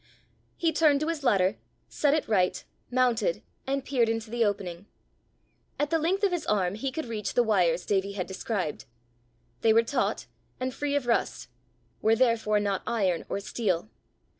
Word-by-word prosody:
He 330 -1 +2
turned 300 -2 +4
to 310 - 0
his 320 -4 -3
ladder, 195 -5 +3 0.3
set 290 0 +2
it 310 - -1
right, 185 -4 +1 0.3
mounted, 255 - +1 0.2
and 275 0 -1
peered 240 -4 +2
into 225 -1 -3
the 240 -1 +1
opening. 195 -3 -2 0.9
At 295 +1 0
the 325 - +3
length 370 +6 0
of 400 - +4
his 350 -2 -2
arm 190 -3 +1
he 260 +6 -3
could 315 +2 -4
reach 220 -3 -4
the 245 - +5
wires 180 -6 +2
Davie 200 0 0
had 185 -3 -3
described: 190 -4 -3 0.8
they 225 - +5
were 230 +1 +5
taut, 250 +5 -1 0.3
and 255 0 -2
free 290 +1 -2
of 285 -3 0
rust 235 -1 0 0.5
were 220 +1 +4
therefore 225 -3 +2
not 200 -2 -1
iron 190 -7 0
or - - -1
steel. 200 -2 -2
225 Hz, 170 wpm, -28 LUFS, 200-275 Hz, 0.9 s, the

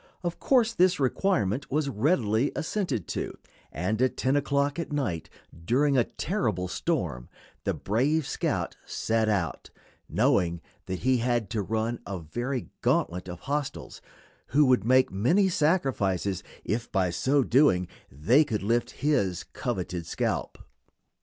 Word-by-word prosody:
Of 175 -1 -3
course 240 -4 +3
this 185 -3 +3
requirement 130 - 0
was 150 +1 0
readily 120 - +1
assented 165 - -2
to, - - -4 0.3
and 95 - -1
at 130 -1 +1
10 130 +2 +1
o'clock 140 +1 +1
at 170 - -4
night, 110 - -2 0.3
during 140 - +2
a 125 - +4
terrible 110 - -2
storm, 85 - -2 0.4
the - - 0
brave 135 +9 +1
scout - - -2
set 110 -1 0
out, 95 -6 -1 0.4
knowing 90 - +2 0.3
that 95 -1 -4
he 130 0 +3
had 120 -3 0
to 110 - 0
run 110 +3 -2
a 100 -1 -3
very 120 - -4
gauntlet 90 +1 0
of 90 -1 -7
hostiles, 145 0 -4 0.5
who 145 +4 +4
would 125 -6 +3
make 130 +3 +4
many 150 - +3
sacrifices 130 - +1 0.2
if 115 +2 -2
by 95 -3 +1
so 135 +9 +2
doing 120 - +3 0.2
they 100 - +4
could 110 -9 -3
lift 120 +4 -1
his 100 - +1
coveted 90 -2 -3
scalp. - - -2
120 Hz, 140 wpm, -27 LUFS, 95-145 Hz, 0.5 s, a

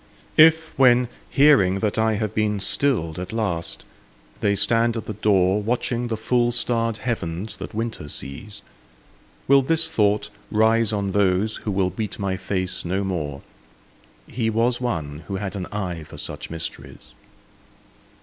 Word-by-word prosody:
If, 160 +1 +5
when 125 -2 +5 0.2
hearing 135 -11 +5
that 105 -2 0
I 110 0 +2
have 105 0 -2
been 105 -1 0
stilled 95 - 0
at 90 - -6
last, 100 -7 -3 0.5
they 100 -1 +1
stand 115 +3 +2
at 110 - -5
the 110 - -4
door, 100 -1 +2
Watching 120 +2 -1
the 115 -2 -2
full 120 +2 +1
starred 115 -2 +1
heavens 105 -4 -4
that - - -8
winter 110 -9 -4
sees, 75 +9 -7 0.8
Will 140 0 +6
this 160 +4 +1
thought 105 -5 +1 0.2
rise 110 +1 +3
on 100 -2 -1
those 100 +2 +1
who 105 - -4
will 95 -2 0
meet 110 +1 -4
my 100 -3 -1
face 95 0 -3
no 95 +3 -1
more, 75 -7 -3 0.8
"He 115 -1 -2
was 120 +2 +1
one 80 - -3
who 100 - -3
had 95 +1 -4
an 95 -3 -4
eye 90 -5 -4
for 75 - -12
such 75 0 -6
mysteries"? 80 0 -6
105 Hz, 150 wpm, -23 LUFS, 95-115 Hz, 0.8 s, Will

